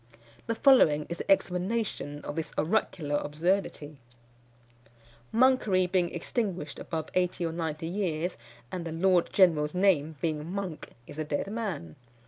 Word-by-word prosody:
The 230 Hz, -, 0 dB
following 165 Hz, -, +5 dB
is 170 Hz, -, -5 dB
the -, -, -6 dB
explanation 185 Hz, -5 st, 0 dB
of 145 Hz, -, -5 dB
this 160 Hz, -1 st, -4 dB
oracular 155 Hz, -4 st, 0 dB
absurdity: 155 Hz, -1 st, -1 dB, 1.3 s
"_Monkery 220 Hz, -7 st, +3 dB
being 180 Hz, -2 st, +2 dB
extinguished 175 Hz, -3 st, -3 dB
above 160 Hz, -2 st, -4 dB
eighty 180 Hz, -1 st, 0 dB
or 165 Hz, -, -1 dB
ninety 160 Hz, -1 st, -3 dB
years, 175 Hz, -2 st, -2 dB, 0.4 s
and 180 Hz, -2 st, -4 dB
the 165 Hz, -, -5 dB
Lord 175 Hz, +1 st, +2 dB
General's 160 Hz, -5 st, +3 dB
name 170 Hz, -5 st, +2 dB
being 155 Hz, +1 st, -2 dB
Monk, 190 Hz, -5 st, -5 dB, 0.2 s
is 145 Hz, -, -10 dB
the 155 Hz, -, -1 dB
dead 150 Hz, +6 st, -2 dB
man. 195 Hz, -, -4 dB
170 Hz, 135 wpm, -29 LUFS, 155-195 Hz, 1.3 s, following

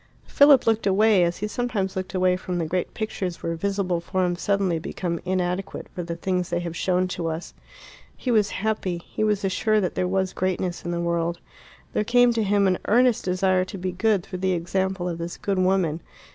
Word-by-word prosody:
Philip 285 Hz, -2 st, +6 dB
looked 225 Hz, -2 st, +2 dB
away, 200 Hz, -1 st, +4 dB
as 170 Hz, 0 st, 0 dB
he 210 Hz, -, -3 dB
sometimes 210 Hz, -4 st, -2 dB
looked 190 Hz, 0 st, -4 dB
away 185 Hz, 0 st, +3 dB
from 180 Hz, -1 st, -4 dB
the 170 Hz, -, -1 dB
great 180 Hz, +3 st, -2 dB
pictures 190 Hz, -5 st, -4 dB
where 165 Hz, -, -1 dB
visible 185 Hz, 0 st, -1 dB
forms 175 Hz, 0 st, -1 dB
suddenly 195 Hz, -4 st, +1 dB
become 170 Hz, +1 st, -3 dB
inadequate 185 Hz, +1 st, -2 dB
for 180 Hz, -, -4 dB
the 170 Hz, -1 st, -4 dB
things 180 Hz, +1 st, -1 dB
they 175 Hz, 0 st, -1 dB
have 170 Hz, -1 st, -5 dB
shown 185 Hz, +1 st, +1 dB
to 175 Hz, -2 st, -3 dB
us. 160 Hz, +2 st, -5 dB, 0.6 s
He 255 Hz, -, -2 dB
was 210 Hz, -3 st, +3 dB
happy; 195 Hz, -5 st, -2 dB
he -, -, -3 dB
was 210 Hz, -2 st, +1 dB
assured 210 Hz, +2 st, +1 dB
that 180 Hz, -, -1 dB
there 180 Hz, -, 0 dB
was 190 Hz, 0 st, 0 dB
greatness 185 Hz, -1 st, -2 dB
in 170 Hz, -, -4 dB
the 170 Hz, 0 st, -1 dB
world. 170 Hz, 0 st, -1 dB, 0.5 s
There -, -, +1 dB
came 245 Hz, +2 st, +4 dB
to 230 Hz, -, 0 dB
him 200 Hz, -1 st, +2 dB
an 185 Hz, -1 st, +2 dB
earnest 245 Hz, +1 st, +3 dB
desire 185 Hz, 0 st, +2 dB
to 195 Hz, -, -8 dB
be 185 Hz, 0 st, -3 dB
good 200 Hz, 0 st, +1 dB
through 185 Hz, -1 st, -7 dB
the 190 Hz, 0 st, +1 dB
example 185 Hz, +1 st, -1 dB
of 170 Hz, -1 st, -4 dB
this 170 Hz, +1 st, -5 dB
good 195 Hz, -2 st, -1 dB
woman. 185 Hz, -4 st, +1 dB
185 Hz, 205 wpm, -24 LUFS, 175-200 Hz, 0.6 s, Philip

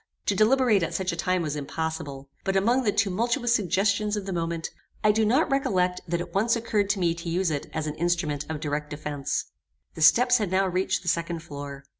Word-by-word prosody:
To 200 Hz, -, +1 dB
deliberate 220 Hz, 0 st, +4 dB
at 165 Hz, -, -2 dB
such 190 Hz, -1 st, -1 dB
a -, -, -4 dB
time 180 Hz, +1 st, 0 dB
was 150 Hz, -2 st, -2 dB
impossible; 145 Hz, -2 st, -4 dB, 0.2 s
but 195 Hz, -1 st, -1 dB
among 235 Hz, +7 st, +3 dB
the 220 Hz, -5 st, +1 dB
tumultuous 235 Hz, +6 st, +1 dB
suggestions 205 Hz, +1 st, +1 dB
of 200 Hz, -, -4 dB
the 195 Hz, -, -3 dB
moment, 165 Hz, -1 st, -3 dB, 0.3 s
I 215 Hz, -, +6 dB
do 220 Hz, +1 st, +1 dB
not 260 Hz, +8 st, +2 dB
recollect 185 Hz, -10 st, +1 dB
that 170 Hz, +1 st, -1 dB
it 175 Hz, -, -6 dB
once 225 Hz, +5 st, +2 dB
occurred 215 Hz, -3 st, 0 dB
to 200 Hz, -1 st, +1 dB
me 170 Hz, -2 st, +2 dB
to 170 Hz, 0 st, -6 dB
use 175 Hz, 0 st, 0 dB
it 145 Hz, -2 st, -3 dB
as 155 Hz, -, -3 dB
an 150 Hz, -, -3 dB
instrument 170 Hz, -4 st, -1 dB
of 160 Hz, -1 st, -3 dB
direct 150 Hz, -1 st, -3 dB
defence. 150 Hz, -2 st, -3 dB, 0.4 s
The -, -, -8 dB
steps 245 Hz, +10 st, +6 dB
had 210 Hz, -4 st, -1 dB
now 190 Hz, +1 st, +2 dB
reached 185 Hz, +1 st, 0 dB
the -, -, -11 dB
second 170 Hz, -1 st, -1 dB
floor. 140 Hz, -2 st, -8 dB
180 Hz, 215 wpm, -26 LUFS, 160-210 Hz, 0.4 s, I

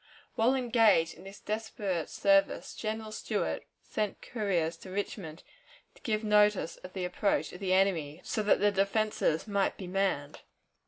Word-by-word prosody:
While 235 Hz, +4 st, +3 dB
engaged 225 Hz, -10 st, +3 dB
in -, -, -15 dB
this 195 Hz, +1 st, -10 dB
desperate 210 Hz, -5 st, -3 dB
service, 195 Hz, 0 st, +2 dB
General 220 Hz, 0 st, -4 dB
Stuart -, -, -2 dB, 0.2 s
sent 210 Hz, -2 st, -3 dB
couriers 180 Hz, -8 st, -1 dB
to 185 Hz, -, -11 dB
Richmond 185 Hz, -4 st, -5 dB, 0.5 s
to -, -, -21 dB
give 215 Hz, -1 st, -1 dB
notice 210 Hz, -4 st, +3 dB
of 185 Hz, -, -11 dB
the 185 Hz, -2 st, -2 dB
approach 190 Hz, +3 st, 0 dB
of 180 Hz, -, -9 dB
the 190 Hz, -1 st, 0 dB
enemy, 175 Hz, -6 st, +1 dB
so 215 Hz, -, -1 dB
that 210 Hz, -1 st, +3 dB
the 205 Hz, 0 st, +4 dB
defenses 200 Hz, -3 st, +1 dB
might 200 Hz, -2 st, 0 dB
be 190 Hz, -, -7 dB
manned. 180 Hz, -6 st, -1 dB
200 Hz, 155 wpm, -30 LUFS, 185-215 Hz, 0.5 s, the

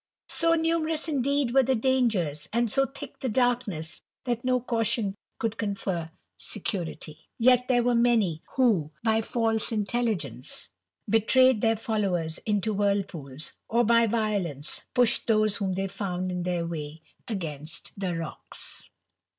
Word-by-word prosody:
So 330 Hz, 0 st, +4 dB
numerous, 325 Hz, -1 st, 0 dB
indeed, 280 Hz, -3 st, +1 dB
were 270 Hz, -, +7 dB
the 260 Hz, +1 st, +2 dB
dangers, 220 Hz, -, +1 dB
and 235 Hz, 0 st, +3 dB
"O 270 Hz, -1 st, +3 dB
thick 275 Hz, -, -10 dB
the 260 Hz, -, -2 dB
darkness, 215 Hz, -10 st, 0 dB, 0.2 s
that 240 Hz, -2 st, -2 dB
no 255 Hz, 0 st, +2 dB
caution 230 Hz, -4 st, 0 dB, 0.2 s
could 225 Hz, -1 st, -2 dB
confer 195 Hz, -5 st, -2 dB, 0.3 s
security. 170 Hz, -6 st, -5 dB
• -, -, +1 dB
ct 250 Hz, 0 st, +5 dB
there 245 Hz, -2 st, +3 dB
were 245 Hz, 0 st, +2 dB
many, 230 Hz, -9 st, +3 dB
who, 220 Hz, -, +3 dB
by 225 Hz, -1 st, +3 dB
false 225 Hz, -1 st, 0 dB
intelligence 205 Hz, -, -2 dB, 0.4 s
betrayed 245 Hz, +2 st, +4 dB
■ -, -, -11 dB
'*>«it 225 Hz, -1 st, +3 dB
followers 190 Hz, -7 st, -1 dB
into 210 Hz, 0 st, +1 dB
whirlpools, 195 Hz, -9 st, -2 dB, 0.2 s
or 235 Hz, +1 st, +3 dB
by 230 Hz, 0 st, +4 dB
violence 200 Hz, -, -1 dB
pushed 245 Hz, -2 st, +3 dB
'Ivjse 215 Hz, -2 st, +3 dB
whom 190 Hz, -2 st, 0 dB
they 195 Hz, +1 st, -1 dB
found 185 Hz, -2 st, -3 dB
in 180 Hz, 0 st, -2 dB
their 175 Hz, -1 st, -1 dB
way 155 Hz, -1 st, -6 dB, 0.2 s
against 160 Hz, -7 st, -4 dB
the 185 Hz, -3 st, -2 dB
rocks. 165 Hz, -2 st, -7 dB
215 Hz, 140 wpm, -27 LUFS, 180-245 Hz, 0.4 s, were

